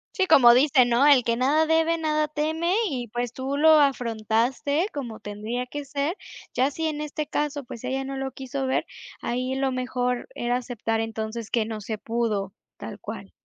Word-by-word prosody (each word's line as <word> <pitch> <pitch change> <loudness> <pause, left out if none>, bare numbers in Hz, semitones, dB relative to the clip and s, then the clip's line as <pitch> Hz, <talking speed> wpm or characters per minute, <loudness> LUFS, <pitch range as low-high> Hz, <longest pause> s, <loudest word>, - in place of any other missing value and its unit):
Sí, 380 - +2
como 240 -9 +7
dicen, 255 -1 +4
¿no?, 240 +4 +4
"el 280 -4 +6
que 230 -1 +1
nada 290 +5 +3
debe 325 +1 +3
nada 305 -1 0
teme" 315 +4 -1 0.2
y, 250 -5 -4
pues, 240 +1 -3
tú 265 +2 -3
lo 315 +2 +6
afrontaste 255 - +1
como 240 -7 -5
tendría 215 +5 -4
que 290 +2 -6
ser, 285 +5 -2 0.4
ya 260 +3 +2
si 320 +2 -2
en 300 -1 -3
este 300 0 -4
caso, 295 0 -2
pues, 245 -2 -10
ella 265 +1 -2
no 270 0 -5
lo 270 0 -3
quiso 265 +1 -4
ver, 260 - 0 0.4
ahí 255 +2 -2
lo 270 0 0
mejor 250 -1 -2
era 240 +1 -1
aceptar 230 -2 -2
entonces 225 0 -5
que 230 -2 +1
no 220 -1 -5
se 215 +2 -4
pudo. 215 -4 -2 0.2
Tal - - -8
cual. - - -8
260 Hz, 185 wpm, -25 LUFS, 235-290 Hz, 0.4 s, como